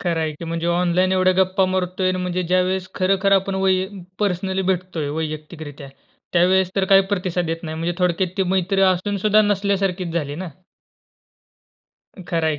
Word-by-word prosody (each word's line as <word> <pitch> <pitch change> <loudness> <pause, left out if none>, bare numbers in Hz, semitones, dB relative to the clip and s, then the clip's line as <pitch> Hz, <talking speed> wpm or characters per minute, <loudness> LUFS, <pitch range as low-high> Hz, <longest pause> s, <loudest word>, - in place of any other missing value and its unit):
खर 170 -2 -1
आहे 155 -1 -1
की 170 - -9
म्हणजे 165 +1 -3
ऑनलाईन 180 +2 +2
एवढ्या 185 0 +3
गप्पा 190 +1 +3
मारतोय 185 0 0
म्हणजे 180 0 -2
ज्यावेळेस 185 +1 0
खरखर 195 +1 +1
आपण 195 0 +2
वै 190 - +4 0.5
पर्सनली 190 -1 -1
भेटतोय 175 -5 -2
वैयक्तिक 155 +1 -5
रित्या, 145 -2 -9 0.4
त्यावेळेस 185 +1 +3
तर 195 - +2
काही 195 - +8
प्रतिसाद 180 -3 -1
येत 165 +1 -3
नाही. 160 -1 -5
म्हणजे 170 +2 -2
थोडक्यात 180 0 +1
ती 195 - +2
मैत्री 190 +1 +1
असून 190 +2 +2
सुद्धा 215 +2 +4
नसल्यासारखीच 195 -3 0
झाली 145 -4 -2
ना. - - -6 1.8
खरं 165 -2 0
आहे 150 -2 -1
185 Hz, 160 wpm, -21 LUFS, 170-190 Hz, 1.8 s, काही